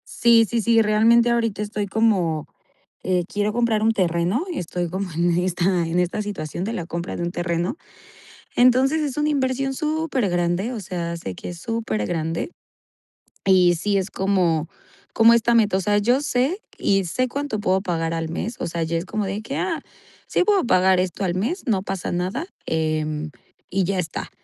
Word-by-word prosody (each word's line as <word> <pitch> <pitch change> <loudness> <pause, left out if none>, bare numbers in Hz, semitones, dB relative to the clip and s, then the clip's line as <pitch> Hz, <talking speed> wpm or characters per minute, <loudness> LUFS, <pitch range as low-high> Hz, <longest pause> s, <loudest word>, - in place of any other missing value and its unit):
Sí, 235 -1 +5
sí, 230 +1 -1
sí, 230 +1 +4
realmente 230 +3 +4
ahorita 230 -3 0
estoy 210 -1 -3
como 190 -8 +1 0.5
eh, 180 -2 +1
quiero 205 +1 -1
comprar 230 -2 +1
un 225 - +4
terreno, 180 - 0
estoy 175 - -3
como 190 +2 -4
en 170 +1 +1
esta 180 0 +1
en 165 +2 -1
esta 180 +4 0
situación 180 -5 -5
de 220 - -2
la 175 -7 -4
compra 170 +1 -4
de 170 - -3
un 175 - -3
terreno. 175 - -1 0.8
Entonces 255 +5 +4
es 285 -4 -2
una 300 0 +1
inversión 270 -1 0
supergrande, 245 - -1
o 220 - -5
sea, 170 -2 -4
sé 95 - -6
que - - -9
es 175 -1 -8
supergrande, 165 - -2 0.9
y 180 -2 +5
sí, 200 +4 0
es 190 +1 -3
como, 180 -5 +1 0.4
como 230 +1 +6
esta 235 0 +3
meta. 210 -4 +3
O 190 - 0
sea, 205 +2 +2
yo 245 +7 +2
sé, 290 - 0 0.2
y 195 -1 +2
sé 255 +9 -1
cuánto 280 -4 -3
puedo 190 -1 +1
pagar 165 -3 -1
al 165 -1 -3
mes. 225 +7 -4
O - - -3
sea, 170 0 -3
ya 165 +1 -1
es 165 - -2
como 210 +1 -3
de 200 +3 -3
que: 275 +5 -4
"Ah, 335 -4 -2 0.4
sí, - - +1
puedo 400 -4 +3
pagar 185 -3 +4
esto 185 +2 -1
al 175 -1 0
mes, 250 - -2
no 205 -6 +1
pasa 190 -2 -4
nada, 185 - -2 0.2
em 155 -1 -1 0.4
y 190 0 0
ya 195 +1 -1
está". 165 -3 -4
195 Hz, 185 wpm, -22 LUFS, 175-235 Hz, 0.9 s, como